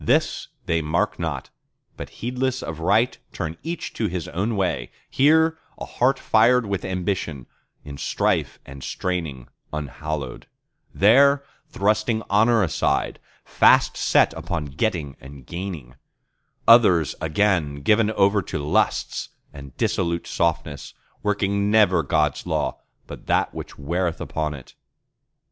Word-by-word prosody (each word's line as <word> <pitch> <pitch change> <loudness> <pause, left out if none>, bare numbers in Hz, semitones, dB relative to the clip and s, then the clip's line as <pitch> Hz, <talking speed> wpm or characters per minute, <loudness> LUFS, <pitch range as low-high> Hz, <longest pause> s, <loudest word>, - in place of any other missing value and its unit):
This 155 +6 +1 0.2
they 85 -3 +1
mark 85 +8 -1
not, 80 -6 -4 0.4
but - - -8
heedless 130 +2 -1
of 80 -1 -6
right, 105 +9 +2 0.2
turn 80 -3 -4
each 170 +1 -5
to 110 - -1
his 90 -3 -4
own 105 +6 -2
way, 95 -2 -1 0.2
Here, 160 +3 +4 0.2
a - - -6
heart 135 +2 +1
fired 115 +2 +3
with 100 -2 -3
ambition, 90 -7 -3 0.4
in 70 -1 -8
strife - - 0
and 70 0 -10
straining 80 -9 -4 0.2
unhallowed; 75 -2 -5 0.4
There, 140 +7 +5 0.3
thrusting 110 +2 0
honour 110 +2 +4
aside, 85 - 0 0.3
fast - - +4
set - - +3
upon 85 -4 -4
getting 80 -6 -2
and 70 -1 -12
gaining; 85 -8 -6 0.7
Others 100 -9 +6
again 80 -4 0
given 105 +5 +3
over 100 -1 +3
to 85 - -5
lusts 75 0 0 0.2
and 70 -2 -11
dissolute 85 -1 -1
softness, 80 -4 -2 0.3
Working 100 -1 0
never 105 -4 +4
God's 75 -4 0
Law, - - -1 0.3
but - - -11
that - - +1
which - - -8
wareth 85 +4 -2
upon 75 -1 -3
it. 65 - -13
90 Hz, 125 wpm, -23 LUFS, 75-110 Hz, 0.7 s, Others